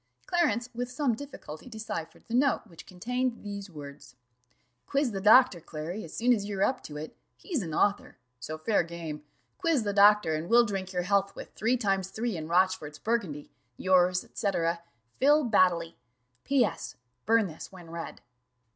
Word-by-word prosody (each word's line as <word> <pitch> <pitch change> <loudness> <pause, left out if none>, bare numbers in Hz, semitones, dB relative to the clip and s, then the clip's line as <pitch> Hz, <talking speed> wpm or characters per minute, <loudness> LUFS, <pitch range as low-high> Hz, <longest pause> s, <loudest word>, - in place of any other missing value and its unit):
Clarence 245 -10 +1
with 245 +1 -3
some 260 -1 0
difficulty 250 - -9
deciphered 220 -8 -6
the 230 - -7
note, 265 +2 +3
which 170 -7 -14
contained 245 +6 -2
these 200 -1 -6
words: 140 -4 -11 0.7
"Quiz 275 -3 +1
the 195 -2 -4
doctor, 215 -2 +6
Clary, 165 +6 -6
as 160 - -10
soon 245 +2 +3
as 205 -4 -1
you 205 -1 -4
are 190 - +2
up 260 - +1
to 150 - -8
it 155 +1 -7 0.2
he's 330 - -3
an 165 -4 -5
author 200 +2 0 0.2
so 155 +5 -6
fair 200 +7 +2
game 165 -3 -6 0.4
quiz 330 -9 +2
the 205 -1 -1
doctor, 205 -4 +6
and 155 +3 -3
we'll 240 +1 +6
drink 195 -3 -4
your 180 -1 -1
health 200 +1 +1
with - - -9
three 235 +4 +1
times 195 -4 0
three 225 +1 -2
in 155 -2 -5
Rochfort's 175 -4 +1
burgundy. 190 -11 -2 0.3
"Yours, 180 -1 +3
&c. 205 - -2 0.7
"PHIL. 295 +3 +5
BADDELY. 180 -7 +2 0.5
"P.S. 245 - 0 0.3
Burn 225 -1 +4
this 160 -4 -8
when 175 -3 -12
read." 170 0 -7
200 Hz, 170 wpm, -29 LUFS, 170-235 Hz, 0.7 s, doctor